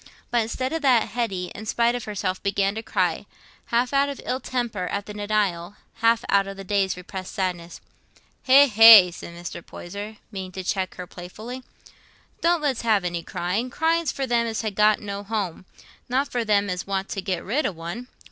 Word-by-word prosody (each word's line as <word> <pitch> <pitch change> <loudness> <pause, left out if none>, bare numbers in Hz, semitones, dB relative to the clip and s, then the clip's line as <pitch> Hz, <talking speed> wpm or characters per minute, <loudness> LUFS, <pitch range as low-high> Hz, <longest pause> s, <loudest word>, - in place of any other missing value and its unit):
But 240 -1 +3
instead 255 +5 -3
of 325 - -2
that, 255 -5 +3
Hetty, 195 -7 -3
in 215 +1 -8
spite 235 +2 +2
of 245 -2 -4
herself, 190 -3 -3
began 200 0 +1
to 220 - -4
cry, 185 -3 -1 0.4
half 240 +3 +1
out 280 +1 +3
of 280 - -6
ill 255 +1 -1
temper 240 -8 -3
at 200 +2 -3
the 210 - -8
denial, 205 -3 -1 0.2
half 230 0 +2
out 200 0 +3
of 195 0 -7
the 195 - -7
day's 195 -1 0
repressed 185 +1 -8
sadness. 175 -3 -3 0.6
"Hegh, 275 +2 +7
hegh!" 220 -6 +9
said 170 -1 -9
Mr. 175 0 -7
Poyser, 205 +4 -8
meaning 190 -3 -6
to 190 0 -5
check 185 0 -2
her 180 - -6
playfully, 215 +9 -9 0.8
"don't 340 -2 +2
let's 270 -5 0
have 215 -5 +2
any 175 -1 -2
crying. 190 +10 -2
Crying's 325 +2 +1
for 270 - -3
them 235 -2 +1
as 225 0 -3
ha' 215 -2 -2
got 210 +1 +4
no 200 -1 -5
home, 200 -5 -3 0.4
not 265 +3 0
for 240 -1 0
them 205 -2 +2
as 180 -1 -4
want 195 0 -2
to 195 - -3
get 185 -3 -3
rid 260 +8 0
o' - - -2
one. 170 +9 -7
205 Hz, 195 wpm, -24 LUFS, 185-240 Hz, 0.8 s, hegh